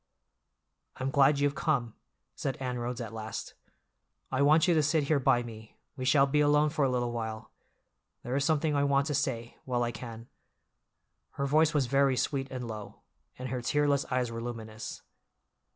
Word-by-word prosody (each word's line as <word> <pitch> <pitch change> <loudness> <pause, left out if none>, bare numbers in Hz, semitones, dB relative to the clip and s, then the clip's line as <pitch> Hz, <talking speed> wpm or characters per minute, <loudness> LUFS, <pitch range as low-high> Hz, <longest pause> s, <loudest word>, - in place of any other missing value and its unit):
"I'm 130 +1 -2
glad 140 0 +5
you've 145 0 +2
come," 130 -7 0 0.4
said 135 - -3
Anne 125 -2 -3
Rhodes 120 0 -3
at 115 -2 -6
last. 110 -1 -6 0.8
"I 130 +1 +1
want 155 +4 +5
you 175 - +4
to 155 - +4
sit 150 +1 +2
here 145 +1 +2
by 120 -2 +3
me, 110 -2 -11 0.2
we 130 -2 -4
shall 135 +1 +5
be 145 +2 +1
alone 150 0 +4
for 150 -2 0
a 135 - +3
little 120 -1 0
while. 110 -2 -5 0.7
There 125 +2 -3
is 140 - +1
something 155 0 +1
I 140 - +2
want 140 -1 +2
to 150 - -2
say—while 125 -2 -2
I 120 - -1
can." 115 0 -9 1.1
Her 140 - -2
voice 155 +3 +3
was 140 -3 +3
very 135 0 +2
sweet 135 +2 -1
and 125 -2 -5
low, 110 -2 -8 0.4
and 130 0 -5
her 125 0 -3
tearless 145 +2 +1
eyes 125 -2 0
were 115 0 -5
luminous. 110 -2 -7
130 Hz, 180 wpm, -30 LUFS, 120-145 Hz, 1.1 s, glad